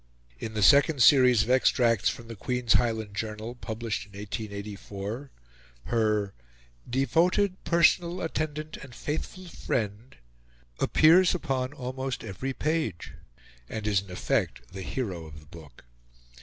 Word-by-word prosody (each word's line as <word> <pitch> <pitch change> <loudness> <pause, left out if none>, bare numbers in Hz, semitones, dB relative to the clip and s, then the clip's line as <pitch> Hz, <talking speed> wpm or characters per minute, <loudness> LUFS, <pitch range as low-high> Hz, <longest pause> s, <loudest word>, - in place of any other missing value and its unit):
In 110 - -6
the 105 - +1
second 140 +1 +6
series 125 -4 +6
of 120 - -2
extracts 120 -4 +3
from 115 - -7
the 115 - -7
Queen's 125 +2 0
Highland 110 -3 0
Journal, 110 +2 -4
published 115 -3 -4
in 100 -1 -14
1884, 105 +3 -6 0.6
her 105 -3 0 0.6
"devoted 175 - +1
personal 170 +1 +3
attendant 155 -1 -3
and 130 -3 -12
faithful 160 +5 -5
friend" 115 - -4 0.6
appears 175 +4 +5
upon 135 -6 -2
almost 130 -1 -4
every 115 +8 -4
page, 155 - -2 0.6
and 110 -1 -5
is 100 -3 +2
in 100 - -15
effect - - -2
the 95 - -6
hero 95 -6 -4
of 75 0 -11
the 75 - -18
book. 75 -5 -14
120 Hz, 130 wpm, -27 LUFS, 105-140 Hz, 0.6 s, second